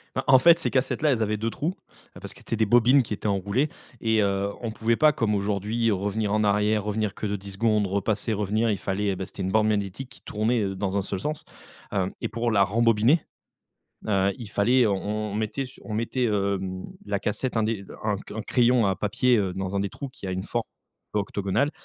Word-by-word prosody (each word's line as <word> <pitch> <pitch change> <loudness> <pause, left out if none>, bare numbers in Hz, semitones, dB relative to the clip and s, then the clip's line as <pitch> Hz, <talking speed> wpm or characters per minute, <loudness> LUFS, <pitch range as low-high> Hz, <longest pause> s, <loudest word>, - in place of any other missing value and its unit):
Bah, - - -1
en 130 - +7
fait, 170 +6 +6
ces 165 - -1
cassettes-là, 135 +3 +1
elles 115 - 0
avaient 105 0 0
2 110 +2 -2
trous, 160 +10 -2 0.4
ah - - -11
parce - - -6
que - - -15
c'était 115 - -3
des 110 - +2
bobines 120 +5 +5
qui 110 - -7
étaient 105 - -3
enroulées 100 +9 +1 0.3
et 110 -1 +2
heu, 100 0 0
on 115 -2 -3
pouvait 115 +1 0
pas 155 -1 +5
comme 110 -5 0
aujourd'hui 105 +3 0
revenir 100 +1 -1
en 105 0 +2
arrière, 105 +1 +2
revenir 105 -1 -1
que 110 - -4
de 105 - -1
10 100 0 -10
secondes, 105 0 +2
repasser, 100 +3 0
revenir, 105 +2 +1
il 100 - 0
fallait 100 +1 -1
heu, - - -4
beh, 95 +1 -4
c'était 95 +1 -7
une 95 - -2
bande 110 0 +3
magnétique 100 +4 -2
qui 130 - -16
tournait, 110 +2 0
heu, 95 -1 -2
dans 95 0 -2
un - - 0
seul 95 -1 -4
sens. 150 +4 -3 0.5
Hem, 95 -2 0
et - - -2
pour 115 +1 -1
la 100 -3 +4
rembobiner, 115 - +3 0.9
heu, 100 -1 +2
il 115 -4 -7
fallait 120 +5 +3
on 105 +1 -1
on - - -5
mettait 110 +5 -2
su 130 - -12
on 110 - -5
mettait, 115 +3 -1
hem, 100 -3 -1 0.2
la 100 -1 -1
cassette 115 +4 -2
un 110 - +3
des 105 -2 -1 0.2
un 105 - +2
un - - -2
c 100 - -9
un 110 - -3
crayon 120 -2 +3
à 95 -1 +1
papier, 120 +4 +2
heu, 95 -4 0
dans 95 +1 -3
un - - +1
des 100 -1 -2
trous 140 - -7
qui 125 - -10
a 95 - -2
une 95 +1 -3
forme 120 +1 -2 0.5
octogonale. 100 +6 0
105 Hz, 235 wpm, -25 LUFS, 100-115 Hz, 0.9 s, en